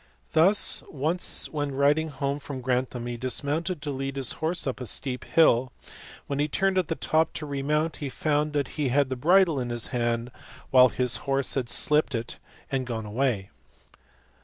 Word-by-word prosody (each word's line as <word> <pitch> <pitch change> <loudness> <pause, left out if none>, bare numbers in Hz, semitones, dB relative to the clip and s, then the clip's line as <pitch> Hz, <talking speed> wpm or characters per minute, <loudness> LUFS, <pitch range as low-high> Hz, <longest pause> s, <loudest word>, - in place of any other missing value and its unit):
Thus 190 +6 +3
once 160 +5 0
when 145 -3 -3
riding 145 +3 +2
home 140 0 -3
from 140 -2 -7
Gran 125 0 0
th - - -16
am 120 -1 -5
he 120 0 -4
dismounted 145 +6 -2
to 145 - -3
lead 135 0 -4
his 135 -3 0
horse 165 +3 -1
up 130 -1 -3
a 125 - -4
steep 125 +3 -2
hill, 130 -6 +3 0.5
when 140 0 -3
he 145 - +2
turned 190 +5 +1
at 180 - -1
the 165 - -2
top 160 0 +1
to 155 - -4
remount 150 +3 -1
he 145 - -4
found 150 +2 -1
that 145 -2 -1
he 140 - +1
had 140 +1 +2
the - - 0
bridle 170 +2 +3
in 120 -1 -3
his 120 -1 -1
hand, 120 0 -1 0.4
while 130 -1 +7
his 125 -1 +1
horse 135 0 +1
had 125 -4 -2
slipped 150 -3 +3
it 115 +1 -4 0.3
and 130 -2 -1
gone 110 -3 -4
away. 105 -3 -1
140 Hz, 190 wpm, -26 LUFS, 125-150 Hz, 0.5 s, while